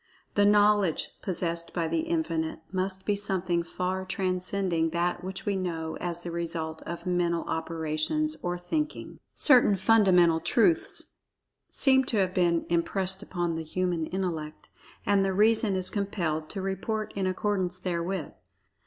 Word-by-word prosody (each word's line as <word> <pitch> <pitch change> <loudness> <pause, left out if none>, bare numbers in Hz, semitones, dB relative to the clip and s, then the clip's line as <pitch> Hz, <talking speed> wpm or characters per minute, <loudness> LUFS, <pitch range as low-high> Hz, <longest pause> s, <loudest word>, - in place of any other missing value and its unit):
The 205 - +4
"knowledge" 205 -4 +4
possessed 170 -2 -2
by 170 -2 0
The 325 - 0
Infinite 320 - -1
must 190 0 -2
be 205 - +2
something 190 -4 0
far 185 +2 -3
transcending 185 -2 -1
that 175 +1 -1
which 190 0 -6
we 205 -2 0
know 165 -4 -3
as 175 -1 -4
the 175 - -5
result 165 -1 -3
of 170 - -6
"mental 175 -2 +1
operations," 160 - -1
or 175 0 -2
"thinking.") 300 - -3 0.2
Certain 245 -8 +5
fundamental 190 -5 +4
truths 230 - +1 0.5
seem 265 -1 +3
to 230 - -1
have 185 -2 +1
been 175 -2 +2
impressed 190 +3 +1
upon 175 -4 -2
the 160 0 -3
human 175 0 -1
intellect, 165 -5 -4 0.4
and 200 -1 +3
the 195 0 0
reason 215 0 +3
is 185 -1 0
compelled 170 -7 -2
to 195 -2 -4
report 210 +3 -2
in 195 -1 0
accordance 185 -1 -1
therewith. 180 -2 -3
185 Hz, 145 wpm, -28 LUFS, 170-200 Hz, 0.5 s, Certain